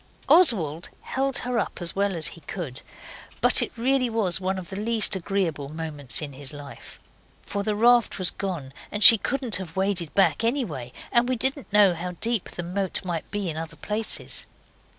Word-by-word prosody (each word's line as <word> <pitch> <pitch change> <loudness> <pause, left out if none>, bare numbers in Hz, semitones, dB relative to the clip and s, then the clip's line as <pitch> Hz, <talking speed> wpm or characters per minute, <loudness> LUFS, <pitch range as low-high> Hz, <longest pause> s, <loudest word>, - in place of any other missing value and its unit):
Oswald 180 - +4
held 270 0 -2
her 250 -1 0
up - - -4
as 175 -2 -1
well 200 -1 0
as 160 -2 0
he 165 - -14
could, 150 -9 -5 0.6
but - - +4
it - - -2
really 255 +1 +1
was 200 -5 0
one 190 +1 -1
of 185 +1 -8
the - - -5
least 220 0 +1
agreeable 175 -7 -2
moments 155 -4 -3
in 145 -2 -7
his 135 +1 -6
life. 145 -1 -11 0.4
For 200 - -4
the 210 +1 -1
raft 240 +1 +3
was 185 -2 +3
gone, 170 -9 -5 0.2
and 210 0 -1
she 225 -3 +11
couldn't 250 -7 -1
have 180 -4 -8
waded 190 -4 -1
back 200 +3 +3
anyway, 205 - -2 0.2
and 240 +1 +3
we 255 - +1
didn't 265 +2 -1
know 205 -3 +5
how 180 +2 -5
deep 230 +2 -1
the 175 - -6
moat 190 +2 -2
might 170 -3 -4
be 205 -2 -3
in 160 -2 -4
other 165 0 -6
places. 215 +1 -4
195 Hz, 190 wpm, -25 LUFS, 165-225 Hz, 0.6 s, she